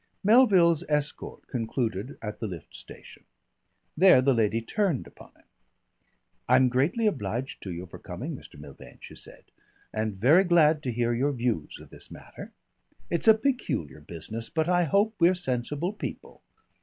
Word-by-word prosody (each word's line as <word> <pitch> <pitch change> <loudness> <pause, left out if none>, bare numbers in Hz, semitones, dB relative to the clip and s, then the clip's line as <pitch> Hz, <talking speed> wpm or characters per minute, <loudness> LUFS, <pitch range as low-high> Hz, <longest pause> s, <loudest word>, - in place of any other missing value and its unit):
Melville's 190 - +5
escort 150 -1 -3
concluded 115 -1 -3
at 105 -1 -6
the 110 - -3
lift 90 -6 -9
station. - - -13 0.7
There 185 -3 +6
the 135 +1 +3
lady 115 -1 +1
turned 170 - -1
upon - - -15
him. - - -27 1.1
"I'm 130 -1 +5
greatly 145 - +1
obliged 125 - -2
to 95 - -6
you 85 +1 -6
for 90 - -12
coming, - - -6
Mr. - - -13
Milvain," - - -13
she - - -12
said; - - -11 0.5
"and 110 -2 -2
very 140 - +5
glad 160 -4 +4
to 125 - -1
hear 120 0 0
your 140 +5 0
views 120 - -2
of - - -15
this - - -11
matter. - - -11 0.6
It's 170 - -1
a 220 - +9
peculiar 220 - -2
business, 85 +9 -7
but 160 -1 -1
I 175 -1 +2
hope 200 +7 +2
we're 175 +2 +4
sensible 150 - -2
people. 210 - -8
135 Hz, 155 wpm, -27 LUFS, 115-175 Hz, 1.1 s, a